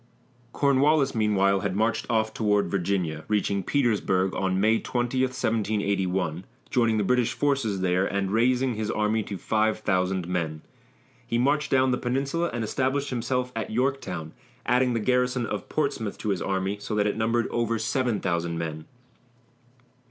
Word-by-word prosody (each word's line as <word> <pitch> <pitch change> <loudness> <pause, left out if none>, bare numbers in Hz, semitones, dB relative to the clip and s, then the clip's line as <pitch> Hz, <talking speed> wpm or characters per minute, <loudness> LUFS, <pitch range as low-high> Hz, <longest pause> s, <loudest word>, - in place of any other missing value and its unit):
Cornwallis, 140 +1 +3
meanwhile, 100 -3 +2
had 95 -1 -2
marched 110 +1 0
off 110 -1 +1
toward 105 -2 +1
Virginia, 90 -5 -1
reaching 100 -2 0
Petersburg 100 -6 +1 0.2
May 110 +4 +3
20, 120 +1 -2
1781, 100 -8 0 0.3
joining 115 -3 +2
the 105 - +1
British 125 +3 +2
forces 135 -9 0
there 90 +1 +2
and 100 -1 -1
raising 125 +3 +2
his 110 -1 -3
army 110 +1 +1
to 100 -1 -6
five 110 +2 +1
thousand 95 -2 0
men. 80 -4 -2 0.6
He 115 - 0
marched 145 +4 +1
down 130 -1 +3
the 125 - 0
peninsula 140 +7 -1
and 120 - -3
established 135 +5 -1
himself 125 +1 -1
at 115 - -3
Yorktown, 125 - -2 0.3
adding 125 -1 +2
the - - +1
garrison 125 +1 +1
of - - -5
Portsmouth 110 -3 -2
to 110 - -4
his 95 -4 0
army, 95 +1 -1
so 105 +1 -4
that 105 -1 +2
it 105 - 0
numbered 115 +2 +1
over 115 -1 0
seven 120 0 0
thousand 85 -2 -1
men. 80 -2 -4
110 Hz, 150 wpm, -26 LUFS, 95-125 Hz, 0.6 s, Cornwallis